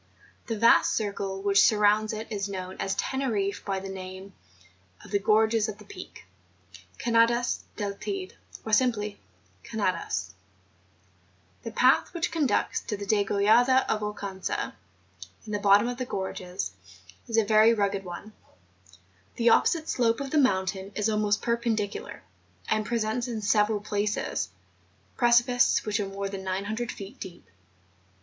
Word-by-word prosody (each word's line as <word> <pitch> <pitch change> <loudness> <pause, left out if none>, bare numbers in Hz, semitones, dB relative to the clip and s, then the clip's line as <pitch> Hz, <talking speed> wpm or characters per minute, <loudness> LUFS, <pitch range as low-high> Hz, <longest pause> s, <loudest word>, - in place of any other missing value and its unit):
The 225 -3 -2
vast 230 +2 +5
circle 200 -2 -3
which 200 0 +4
surrounds 210 0 +3
it 220 0 -5
is 200 -1 -2
known 185 -1 -5
at 195 +1 -2
Tenerifie 220 -7 -1
by 195 -1 -2
the 195 - -7
name 190 0 -8 0.7
of - - -14
the 200 - +2
gorges 220 +1 +3
of 210 - -6
the 210 - -15
Peak, 85 - -11 0.7
{Canadas 235 +1 +2
del 205 -2 -3
Teyde, 380 - -5 0.3
or 220 - -4
simply 210 -4 +1 0.4
Canadas), 185 - -2 1.3
The - - -6
path 255 +8 +3
which 340 0 -1
conducts 305 -5 0
to 210 - -4
the 200 - -6
Degollada 215 +6 +3
of 215 - 0
Oucanca, 200 -2 -4 0.7
in 215 - -7
the 205 - -1
bottom 205 +2 +5
of 245 0 -4
the 255 - -2
gorges, 180 - -4 0.6
is 230 - -1
a 225 - +4
very 215 +1 +6
rugged 200 -3 0
one; 185 +4 -8 1.0
the 235 0 +3
opposite 315 +7 +3
slope 230 -2 +1
of 275 -1 -5
the 310 - +3
mountain 190 -5 0
is 215 +1 +1
almost 210 -1 +1
perpendicular, 230 - -2 0.5
and 215 -1 0
presents, 235 +1 -1
in 225 -3 -4
several 210 0 +2
places, 205 0 -2 0.7
precipices 240 0 +3
which 210 -1 0
are 200 - -1
more 195 0 -4
than 195 -1 -6
900 200 +5 -3
feet 200 +6 -10
deep. 175 - -10
210 Hz, 140 wpm, -27 LUFS, 200-230 Hz, 1.3 s, very